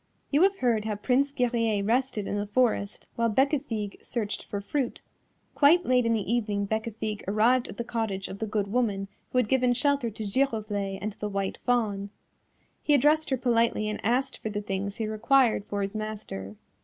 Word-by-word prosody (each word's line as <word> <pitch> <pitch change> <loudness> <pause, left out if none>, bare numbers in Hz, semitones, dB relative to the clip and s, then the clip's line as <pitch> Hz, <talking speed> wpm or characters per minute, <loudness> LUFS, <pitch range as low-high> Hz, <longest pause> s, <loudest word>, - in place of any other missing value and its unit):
You 290 +2 +4
have 390 +1 +4
heard 230 - +1
how 215 -1 -1
Prince 260 +6 +1
Guerrier 230 -6 +1
rested 230 -1 0
in - - -2
the 205 0 -2
forest 215 -2 0
while 230 0 +2
Bécafigue 255 -4 0
searched 220 -4 -3
for 200 - -4
fruit; 245 +5 -2 0.5
quite 330 +5 +5
late 250 -2 +3
in 230 - +3
the 215 +1 -1
evening 210 -4 0
Bécafigue 220 -1 -3
arrived 235 +5 +3
at - - -9
the 235 - -2
cottage 220 -5 -2
of 195 - -8
the 220 - -2
good 210 -1 0
woman 200 -3 -1 0.2
who - - -2
had 250 -3 +3
given 250 0 +3
shelter 275 -1 +1
to 220 0 -7
Giroflée 205 -4 -1
and 210 +2 -3
the 210 - -2
White 195 -1 -2
Fawn. 210 -5 +1 0.7
He 295 - +3
addressed 300 +3 +3
her 265 - +1
politely 230 -3 +2
and 215 - -5
asked 250 +5 0
for 220 - -4
the 205 0 -3
things 200 0 -3
he 225 - -2
required 225 +1 +3
for 200 -1 -2
his 195 +1 -3
master. 210 - -5
220 Hz, 190 wpm, -27 LUFS, 205-250 Hz, 0.7 s, quite